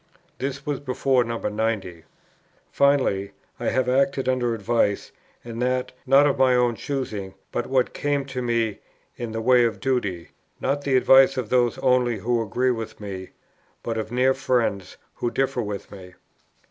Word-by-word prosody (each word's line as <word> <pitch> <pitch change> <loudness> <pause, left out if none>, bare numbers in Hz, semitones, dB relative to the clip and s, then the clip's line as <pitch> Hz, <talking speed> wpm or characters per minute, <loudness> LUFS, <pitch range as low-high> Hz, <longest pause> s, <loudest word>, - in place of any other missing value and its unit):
This 140 +1 -4
was 145 -2 -2
before 130 -1 +1
No. 115 0 -3
90. 105 -6 -3 0.7
"Finally, 130 -9 +2 0.3
I - - -5
have 130 -1 +1
acted 135 +1 +1
under 125 -2 +1
advice, 105 -1 0 0.3
and 115 0 -6
that, 125 0 0 0.2
not 135 +2 +6
of 145 - +1
my 130 -1 +5
own 125 -1 +3
choosing, 110 -7 -4 0.2
but 120 - -2
what 130 -2 +1
came 145 -1 -1
to 130 -2 -5
me 115 -3 0 0.4
in 120 -2 -5
the 110 0 -3
way 125 +1 +5
of 110 -4 0
duty, 100 -9 -2 0.3
nor 135 - +1
the 140 -2 +1
advice 135 +1 +6
of 120 -4 -3
those 120 -2 +2
only 125 -2 +2
who 115 +4 0
agree 125 +4 0
with 115 -2 -5
me, 95 -3 -7 0.5
but 115 - -3
of 110 0 -5
near 130 +2 +3
friends 120 -8 -1 0.2
who 120 - -2
differ 135 -1 -1 0.2
from - - -13
me. 90 -1 -12
125 Hz, 165 wpm, -24 LUFS, 110-130 Hz, 0.7 s, not